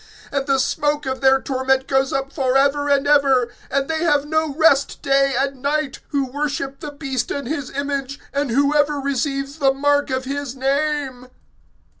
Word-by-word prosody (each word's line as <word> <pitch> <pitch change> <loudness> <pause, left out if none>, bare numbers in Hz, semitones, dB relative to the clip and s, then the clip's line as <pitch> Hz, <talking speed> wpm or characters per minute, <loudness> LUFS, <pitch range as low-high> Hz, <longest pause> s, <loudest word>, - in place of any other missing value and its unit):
(11)And 275 -1 0
the 275 -1 +3
smoke 295 +2 0
of 265 +1 -3
their 270 0 +5
torment 265 0 0
goes 270 0 +1
up 270 0 -3
forever 275 +1 +2
and 280 0 +3
ever; 270 -4 +3 0.2
and 275 0 0
they 320 0 -1
have 295 -4 +2
no 315 0 0
rest 295 -3 +3
day 275 0 +2
and 275 -1 -1
night, 290 0 -1
who 280 -2 -1
worship 275 0 -3
the 300 - -6
beast 275 -4 -3
and 280 -3 -4
his 285 -2 -3
image, 280 0 -3
and 280 -1 -1
whoever 290 +3 +2
receives 275 +1 -2
the 270 -2 +4
mark 290 +1 +1
of 260 0 -2
his 280 -1 -4
name. 275 -1 -1
275 Hz, 170 wpm, -21 LUFS, 270-290 Hz, 0.2 s, their